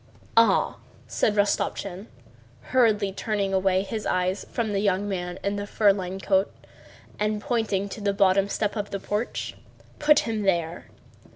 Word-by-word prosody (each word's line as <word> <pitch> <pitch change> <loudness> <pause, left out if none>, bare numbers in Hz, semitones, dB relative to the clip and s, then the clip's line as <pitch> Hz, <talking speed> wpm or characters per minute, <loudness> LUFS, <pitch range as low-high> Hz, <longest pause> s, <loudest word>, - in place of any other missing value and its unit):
"Ah!" 230 0 +4 0.3
said 210 - 0
Rostopchín, 200 -1 -1 0.6
hurriedly 215 -6 +3
turning 200 -1 -2
away 190 0 +2
his 215 +1 -4
eyes 185 +1 0
from 225 -3 -1
the 195 - +1
young 200 0 +1
man 180 -3 -3
in 200 +1 -1
the 205 0 -4
fur 205 -1 +4
lined 190 0 -5
coat 195 0 +2 0.7
and 210 0 0
pointing 210 -4 -1
to 205 +2 -8
the 200 -1 +1
bottom 195 0 +3
step 205 0 -1
of 205 -2 -3
the 195 - -4
porch. 210 +4 -3 0.4
"Put 295 0 +5
him 225 -2 -2
there." 175 -3 0
200 Hz, 155 wpm, -25 LUFS, 190-210 Hz, 0.7 s, Put